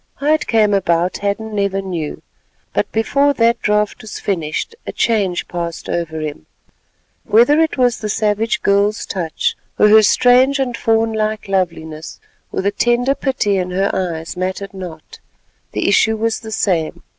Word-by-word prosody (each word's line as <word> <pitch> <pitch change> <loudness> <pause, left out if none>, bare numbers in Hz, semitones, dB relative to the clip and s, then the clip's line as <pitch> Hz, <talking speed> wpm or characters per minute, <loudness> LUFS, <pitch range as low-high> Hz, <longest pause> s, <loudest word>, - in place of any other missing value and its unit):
How 295 +2 +1
it 310 - 0
came 215 -3 +3
about 175 -2 +1
Hadden 205 +2 -3
never 200 -1 0
knew, 175 -6 -5 0.5
but - - -1
before 280 +6 +2
that 235 -1 +2
draught 210 0 0
was 215 -1 -8
finished 165 - -2
a - - -2
change 200 -6 0
passed 170 -1 -5
over 160 -2 -3
him. 150 - -6 0.8
Whether 240 +8 +4
it 320 -2 +1
was 245 -2 +2
the 215 - -4
savage 215 +1 0
girl's 200 +2 +2
touch, 170 -5 -2 0.2
or 210 - +5
her 220 +1 +8
strange 250 +5 +4
and 260 -3 -1
fawn 225 -1 +1
like 215 -1 -2
loveliness, 165 -4 -3 0.3
or - - -2
the 200 - +1
tender 240 +5 +1
pity 250 -8 0
in 180 0 -2
her 195 +2 0
eyes, 170 -3 -3
matters 185 +2 -4
not—the 165 - -8
issue 220 +2 +3
was 225 +1 -1
the 220 -1 -9
same. 175 -7 -1
205 Hz, 155 wpm, -18 LUFS, 180-225 Hz, 0.8 s, her